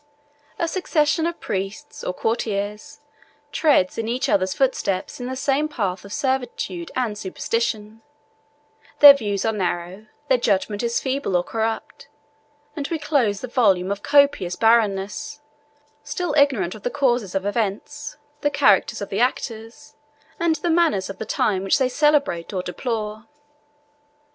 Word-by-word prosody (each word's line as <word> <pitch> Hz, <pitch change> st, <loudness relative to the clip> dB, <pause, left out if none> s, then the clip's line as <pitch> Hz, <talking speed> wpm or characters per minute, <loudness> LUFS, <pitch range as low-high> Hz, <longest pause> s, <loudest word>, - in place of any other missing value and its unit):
A 335 Hz, -, 0 dB
succession 325 Hz, -2 st, +1 dB
of 340 Hz, -, -5 dB
priests, 195 Hz, +1 st, -5 dB
or -, -, -1 dB
courtiers, 210 Hz, 0 st, -3 dB, 0.5 s
treads 280 Hz, -, +2 dB
in 225 Hz, -, -2 dB
each 255 Hz, +4 st, -1 dB
other's 185 Hz, -1 st, +1 dB
footsteps 225 Hz, -8 st, -1 dB
in 245 Hz, -, -5 dB
the 260 Hz, -, -4 dB
same 275 Hz, +3 st, +1 dB
path 200 Hz, -10 st, -3 dB
of 200 Hz, -, -12 dB
servitude 245 Hz, -10 st, -2 dB
and 240 Hz, -5 st, -1 dB
superstition: 215 Hz, +2 st, -3 dB, 1.0 s
their 290 Hz, -1 st, +11 dB
views 205 Hz, -7 st, -2 dB
are 220 Hz, -, +1 dB
narrow, 185 Hz, +1 st, -3 dB, 0.2 s
their 260 Hz, -3 st, +3 dB
judgment 205 Hz, -1 st, 0 dB
is 235 Hz, -1 st, 0 dB
feeble 265 Hz, -7 st, -2 dB
or 175 Hz, -, 0 dB
corrupt; 225 Hz, +3 st, -4 dB, 0.7 s
and 285 Hz, -3 st, -3 dB
we 330 Hz, -, -2 dB
close 275 Hz, -10 st, 0 dB
the 255 Hz, -, -5 dB
volume 200 Hz, -7 st, +2 dB
of 200 Hz, 0 st, -3 dB
copious 280 Hz, -11 st, +3 dB
barrenness, 220 Hz, +4 st, +1 dB, 0.6 s
still 355 Hz, -5 st, -3 dB
ignorant 270 Hz, -, +2 dB
of 215 Hz, -, -11 dB
the 245 Hz, -, -2 dB
causes 245 Hz, -8 st, 0 dB
of 195 Hz, 0 st, -1 dB
events, 220 Hz, +9 st, -3 dB, 0.2 s
the 290 Hz, -, +2 dB
characters 280 Hz, -11 st, +3 dB
of -, -, -7 dB
the 200 Hz, -, -2 dB
actors, 235 Hz, +1 st, -3 dB, 0.5 s
and 335 Hz, -1 st, +2 dB
the 330 Hz, +3 st, -1 dB
manners 320 Hz, -, +2 dB
of 190 Hz, -, -12 dB
the 220 Hz, -, -4 dB
times 195 Hz, -3 st, 0 dB
which 195 Hz, -, +3 dB
they 265 Hz, -2 st, +2 dB
celebrate 285 Hz, -, +1 dB
or 185 Hz, -2 st, -2 dB
deplore. 215 Hz, +2 st, -4 dB
225 Hz, 150 wpm, -22 LUFS, 200-280 Hz, 1.0 s, their